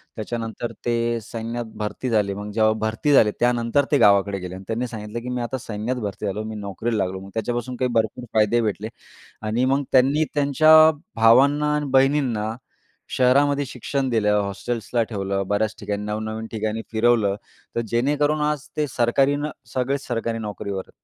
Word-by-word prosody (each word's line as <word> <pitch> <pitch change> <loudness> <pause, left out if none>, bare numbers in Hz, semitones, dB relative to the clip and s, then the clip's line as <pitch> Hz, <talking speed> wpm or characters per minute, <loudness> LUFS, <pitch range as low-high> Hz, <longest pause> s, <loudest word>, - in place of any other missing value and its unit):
त्याच्यानंतर 115 +1 -4
ते 120 0 0
सैन्यात 115 +1 -5
भरती 105 +4 -3
झाले. 105 -3 +1
मग 105 +1 -6
जेव्हा 110 +1 +3
भरती 110 +7 0
झाले, 110 -6 +6
त्यानंतर 120 +3 +2
ते 145 - +5
गावाकडे 100 -3 +4
गेले 90 0 -7
आणि 95 - -9
त्यांनी 115 +2 -2
सांगितलं, 110 -1 -6
की 125 - -6
मी 125 -1 -2
आता 120 +2 -3
सैन्यात 115 +1 -4
भरती 100 +1 -6
झालो. 105 +2 -2
मी 110 0 -6
नोकरीला 105 +3 -3
लागलो. 95 +1 -4
मग 95 +1 -11
त्याच्यापासून 120 +2 -3
काही 125 +1 0
भरपूर 115 +2 0
फायदे 110 +2 +3
भेटले 110 0 -2 0.6
आणि 115 +4 +1
मग 135 +2 +2
त्यांनी 135 +4 +4
त्यांच्या 155 +2 +6 0.3
भावांना 140 +6 +4
आणि 150 -1 -2
बहिणींना 130 -5 +2 0.6
शहरामध्ये 140 +3 +3
शिक्षण 130 +2 -3
दिलं, 105 -3 +2
हॉस्टेल्सला 115 +4 -2
ठेवलं, 100 -2 -2
बऱ्याच 110 +1 0
ठिकाणी 105 0 -3
नव-नवीन 110 +1 -4
ठिकाणी 110 0 -3
फिरवलं. 110 -3 +2 0.4
तर - - +2
जेणेकरून 145 +6 +1
आज 150 0 -4
ते 150 - +1
सरकारी 135 +4 +3
न 150 +1 -3 0.2
सगळेच 135 +2 -1
सरकारी 115 -1 -2
नोकरीवर. 100 -2 -5
115 Hz, 165 wpm, -23 LUFS, 105-130 Hz, 0.6 s, झाले